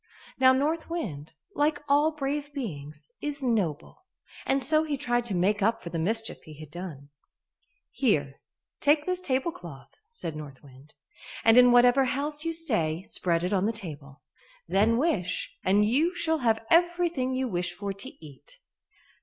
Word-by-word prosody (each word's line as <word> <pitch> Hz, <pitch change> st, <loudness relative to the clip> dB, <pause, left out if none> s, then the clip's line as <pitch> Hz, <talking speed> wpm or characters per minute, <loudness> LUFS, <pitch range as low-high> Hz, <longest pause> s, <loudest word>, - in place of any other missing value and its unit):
Now 260 Hz, 0 st, +7 dB
North 300 Hz, +6 st, 0 dB
Wind, 160 Hz, -, -5 dB, 0.2 s
like 295 Hz, 0 st, +1 dB
all 290 Hz, +2 st, +4 dB
brave 290 Hz, -1 st, -3 dB
beings, 150 Hz, -, -6 dB
is 290 Hz, -1 st, -2 dB
noble, 220 Hz, -, -2 dB, 0.4 s
and 270 Hz, 0 st, +1 dB
so 310 Hz, +4 st, +3 dB
he 300 Hz, -3 st, -2 dB
tried 240 Hz, -3 st, 0 dB
to 205 Hz, -5 st, -1 dB
make 200 Hz, +4 st, +1 dB
up 225 Hz, +3 st, +1 dB
for 170 Hz, -, -7 dB
the 165 Hz, -, -2 dB
mischief 220 Hz, +7 st, -2 dB
he 155 Hz, -1 st, -13 dB
had 155 Hz, -2 st, -11 dB
done. 160 Hz, -6 st, -8 dB, 0.8 s
"Here, 145 Hz, -, 0 dB, 0.4 s
take 295 Hz, +1 st, +3 dB
this 365 Hz, 0 st, -1 dB
tablecloth," 260 Hz, -, -3 dB, 0.2 s
said 315 Hz, -, -3 dB
North 145 Hz, -3 st, -9 dB
Wind, 140 Hz, +2 st, -17 dB, 0.5 s
"and 225 Hz, 0 st, +6 dB
in 250 Hz, 0 st, +8 dB
whatever 245 Hz, +2 st, +5 dB
house 295 Hz, +4 st, -2 dB
you 330 Hz, -, -1 dB
stay, 215 Hz, -, 0 dB
spread 170 Hz, -4 st, -1 dB
it 180 Hz, +3 st, -1 dB
on 195 Hz, +1 st, +2 dB
the -, -, +1 dB
table; 145 Hz, -10 st, -8 dB, 0.4 s
then 220 Hz, +4 st, +3 dB
wish, 225 Hz, -, -1 dB
and 205 Hz, +3 st, +3 dB
you 305 Hz, -, +1 dB
shall 320 Hz, -3 st, 0 dB
have 225 Hz, -3 st, +1 dB
everything 340 Hz, -6 st, +2 dB
you 260 Hz, 0 st, -1 dB
wish 175 Hz, -4 st, -2 dB
for 200 Hz, +2 st, -4 dB
to 195 Hz, -, -8 dB
eat." 150 Hz, -, -14 dB
230 Hz, 160 wpm, -27 LUFS, -, 0.8 s, in